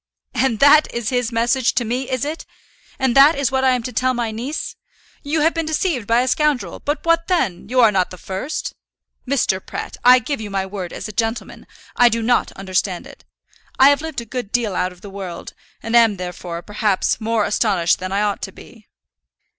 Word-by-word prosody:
"And 255 -2 +1
that 290 +2 +6
is 235 -2 -3
his 245 -2 -1
message 235 +2 +1
to 240 - +1
me, 250 +3 -3
is 255 0 -1
it? 310 +2 -5 0.5
And 260 -2 0
that 280 +4 +7
is 275 -3 0
what 265 0 0
I 260 -1 +4
am 250 -2 -1
to 250 - -5
tell 255 0 +1
my 235 -2 -2
niece? 245 +8 -5 0.5
You 300 +1 -1
have 325 +2 +3
been 330 -1 -2
deceived 310 - -1
by 230 +1 +3
a 255 - -1
scoundrel. 300 0 0
But 295 +3 -3
what 335 0 +2
then? 235 - -1
You 255 0 +3
are 225 -3 +6
not 185 -3 +1
the 185 - -10
first! 195 - -5 0.5
Mr. 230 -8 0
Pratt, - - -7
I 250 +1 +8
give 255 +1 -3
you 210 - -6
my 195 -1 -2
word 190 -2 -6
as - - -6
a - - -7
gentleman, 225 +2 -3 0.3
I 245 0 +6
do 230 0 -1
not 245 +2 +1
understand 185 -1 -2
it. - - -15 0.5
I 265 +1 +7
have 285 0 +2
lived 320 -6 -5
a - - -10
good 240 -2 -5
deal 225 -6 0
out 180 0 0
of 180 0 -17
the 200 - -9
world, 190 -3 -7 0.3
and 230 +1 -1
am, 225 -4 +5
therefore, 180 -1 -6
perhaps, 210 0 0
more 220 -1 +1
astonished 195 -6 +1
than 185 0 -5
I 200 +2 +1
ought 205 -1 -1
to 190 - -5
be." 220 +2 -16
235 Hz, 215 wpm, -20 LUFS, 200-265 Hz, 0.5 s, I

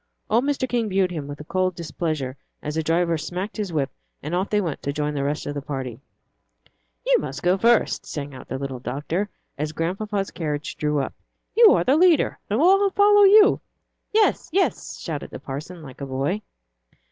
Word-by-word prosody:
Old 235 +4 +3
Mr. 280 -2 0
King 235 -3 0
viewed 190 -1 +2
him 155 -5 -4
with 145 +1 -8
cold 185 0 0
displeasure 155 -5 -3 0.3
as 150 - -3
the 160 - 0
driver 165 +1 +1
smacked 180 +6 -4
his 205 -4 -3
whip 145 -4 -1 0.3
and 150 +4 -4
off 185 +3 0
they 210 - +2
went 170 -7 -3
to 140 - -2
join 150 0 -2
the 140 -1 -1
rest 145 +2 -2
of 145 - -3
the 145 - -4
party. 130 -4 -5 1.1
"You - - +4
must - - -6
go 180 +1 +4
first," 230 +3 +2
sang 145 -1 -5
out 130 - -10
the 130 - -3
little 135 -2 -5
doctor, 150 +11 -3 0.3
as 150 +1 -2
Grandpapa's 195 +5 -2
carriage 150 -3 -3
drove 150 -1 0
up; - - -5 0.4
"you 455 -2 +8
are - - +2
the 270 +4 +3
leader, 345 -2 +4
and 210 +3 +1
we'll 380 +5 +5
all 400 - +4
follow 410 +1 +6
you." 415 +1 +7 0.5
"Yes, 435 0 +2
yes," 380 +3 0
shouted - - -5
the - - -7
parson, 155 +5 -7
like 135 -1 -11
a 140 - -4
boy. 140 +10 -1
170 Hz, 195 wpm, -24 LUFS, 145-220 Hz, 1.1 s, you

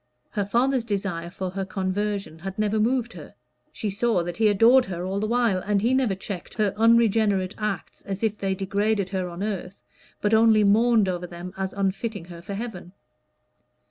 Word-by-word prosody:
Her 205 -2 -1
father's 245 +4 +1
desire 195 -6 -3
for 185 +1 -5
her 195 +1 -3
conversion 195 -2 -3
had 190 +2 -6
never 215 0 +1
moved 240 +2 +1
her; - - -11 0.4
she 210 - -3
saw 210 -2 +1
that 175 0 -5
he 220 -1 +4
adored 230 +5 +5
her 180 -1 -5
all 195 +2 -2
the 215 - -1
while, 235 -5 +2
and 205 +2 0
he 235 +5 +1
never 255 -7 +2
checked 190 -1 -7
her 210 -3 +1
unregenerate 220 -4 +3
acts 210 -4 -4
as 200 +1 -5
if 215 -1 +1
they 195 -2 -2
degraded 200 +1 0
her 185 -2 -2
on 175 +3 -6
earth, 195 -2 -5 0.4
but 210 +1 0
only 220 -1 +5
mourned 220 +1 +4
over 180 -1 -2
them 175 +1 -8
as 190 0 -3
unfitting 200 0 -2
her 170 -1 -10
for 195 +3 -6
heaven. 195 -5 -7
200 Hz, 185 wpm, -25 LUFS, 190-220 Hz, 0.4 s, adored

